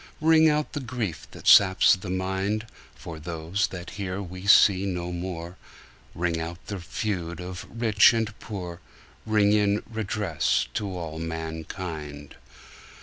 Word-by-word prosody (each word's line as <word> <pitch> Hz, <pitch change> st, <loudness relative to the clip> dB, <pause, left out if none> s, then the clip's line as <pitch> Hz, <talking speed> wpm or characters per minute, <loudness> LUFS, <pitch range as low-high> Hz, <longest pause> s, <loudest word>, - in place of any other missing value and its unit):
Ring 160 Hz, 0 st, +5 dB
out 150 Hz, 0 st, 0 dB
the 145 Hz, -, -2 dB
grief 120 Hz, -, -4 dB
that -, -, -13 dB
saps 95 Hz, -2 st, +7 dB
the 95 Hz, 0 st, -8 dB
mind, 95 Hz, +4 st, -1 dB, 0.3 s
For 80 Hz, -1 st, -9 dB
those 85 Hz, +4 st, -2 dB
that 90 Hz, -1 st, -8 dB
here 95 Hz, 0 st, -3 dB
we 90 Hz, 0 st, -7 dB
see 100 Hz, -1 st, +6 dB
no 90 Hz, -2 st, -3 dB
more, 85 Hz, 0 st, -5 dB, 0.6 s
Ring 85 Hz, -1 st, -1 dB
out 85 Hz, +1 st, -5 dB
the 100 Hz, -2 st, -5 dB
feud 85 Hz, -2 st, -4 dB
of 90 Hz, 0 st, -7 dB
rich 110 Hz, -3 st, +5 dB
and 110 Hz, -2 st, -1 dB
poor, 90 Hz, -5 st, -7 dB, 0.5 s
Ring 105 Hz, -1 st, +3 dB
in 105 Hz, -1 st, +2 dB
redress 105 Hz, -6 st, 0 dB
to 105 Hz, -, -2 dB
all 80 Hz, -2 st, -6 dB
mankind. 80 Hz, -, -6 dB
95 Hz, 140 wpm, -26 LUFS, 85-105 Hz, 0.6 s, saps